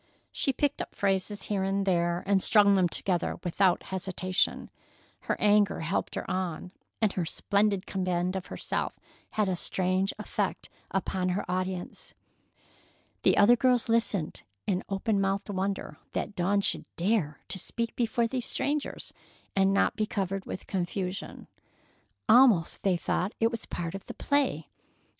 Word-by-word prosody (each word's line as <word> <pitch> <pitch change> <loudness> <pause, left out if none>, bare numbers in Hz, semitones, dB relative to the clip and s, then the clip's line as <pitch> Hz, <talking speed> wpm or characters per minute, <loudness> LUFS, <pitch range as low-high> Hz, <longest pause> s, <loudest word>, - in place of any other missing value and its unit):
She 275 - +1
picked 285 +2 0
up - - -7
phrases 200 +1 0
here 200 -2 -1
and 195 +1 0
there 175 -2 +1
and 195 -1 +3
strung 205 -1 +6
them 185 -3 +3
together 175 0 0
without 180 +1 +2
hesitation. 185 0 -1 0.5
Her - - -2
anger 210 -3 +3
helped 165 +4 -2
her - - -4
on, 180 -1 -3 0.3
and 210 - +3
her 180 - -1
splendid 200 +3 +1
command 185 -1 -1
of 190 - -4
herself - - -3 0.3
had 215 -2 +1
a 185 - 0
strange 185 +2 0
effect - - -3 0.2
upon 185 -1 -1
her 180 +3 -1
audience. 185 0 -4 1.1
The - - +4
other 225 +4 +7
girls 250 -1 +2
listened 220 -7 0 0.2
in 185 -1 0
open 200 +1 0
mouthed 195 +1 -1
wonder 190 -5 -3 0.2
that 205 - -3
Dawn 195 +3 +2
should - - -1
dare 175 -6 0
to 190 - -2
speak 230 +5 -3
before 235 0 +1
these 250 +1 -2
strangers 290 0 -2 0.4
and 195 0 +4
not 195 - +2
be 215 -1 0
covered 195 -1 -2
with - - -6
confusion. 185 0 -3 0.8
Almost 225 -9 +5
they 190 -3 +2
thought 185 +3 -1
it 225 0 +3
was 230 -1 -5
part 165 -1 -4
of 195 - -7
the - - -7
play. 275 - 0
195 Hz, 150 wpm, -29 LUFS, 185-210 Hz, 1.1 s, other